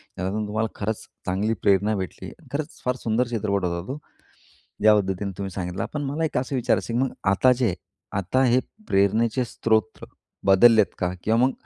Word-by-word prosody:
त्यातून 95 +4 -2
तुम्हाला 110 +2 -1
खरंच 105 +1 -3 0.2
चांगली 100 +4 0
प्रेरणा 100 +2 +3
भेटली, 95 -2 -5 0.2
खरंच 150 +2 -4
फार 125 0 +1
सुंदर 115 +2 +1
चित्रपट 105 -5 -1
होता 85 0 -3
तो. 135 - -4 0.8
ज्या 105 0 +7
पद्धतीने 100 -1 -1
तुम्ही 100 -1 -3
सांगितला. 90 -1 -3
पण 150 - -2
मला 145 +4 -1
एक 150 - -2
असं 130 +2 -1
विचारायचं 120 -1 0
आहे, 120 - +1
की 130 - +3
मग - - -9 0.2
आता 125 +6 +4
जे, 120 -6 0 0.4
आता 100 +8 +1
हे 125 0 +4 0.3
प्रेरणेचे 110 +6 +2
स्रोत 110 -1 0 0.4
बदललेत 110 +3 +7
का? 90 0 -1
किंवा 110 +2 +2
मग 135 - +2
110 Hz, 175 wpm, -24 LUFS, 95-125 Hz, 0.8 s, ज्या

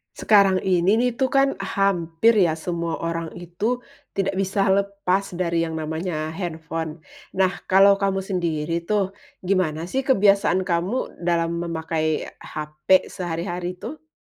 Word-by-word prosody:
Sekarang 195 -3 +4
ini 185 +2 +3
nih 245 +2 +2
tuh, 265 - +3
kan 275 +1 +3
hampir 195 0 +2
ya 170 -5 +3
semua 170 0 -3
orang 165 0 -2
itu 175 +8 -3 0.3
tidak 195 0 0
bisa 195 +1 +1
lepas 200 -1 0
dari 170 -2 0
yang 160 -1 -5
namanya 160 0 -3
handphone. 160 -2 -5 0.3
Nah, 190 -1 +3 0.2
kalau 195 +1 +6
kamu 195 -1 0
sendiri 170 -4 -1
tuh 200 -3 +1 0.3
gimana 180 -4 0
sih 265 - +1
kebiasaan 195 -6 +4
kamu 180 +9 -2
dalam 170 -1 +1
memakai 160 -2 -1 0.2
HP 155 +4 0
sehari-hari 175 +1 -4
tuh? 305 +11 -9
180 Hz, 130 wpm, -23 LUFS, 165-195 Hz, 0.3 s, kalau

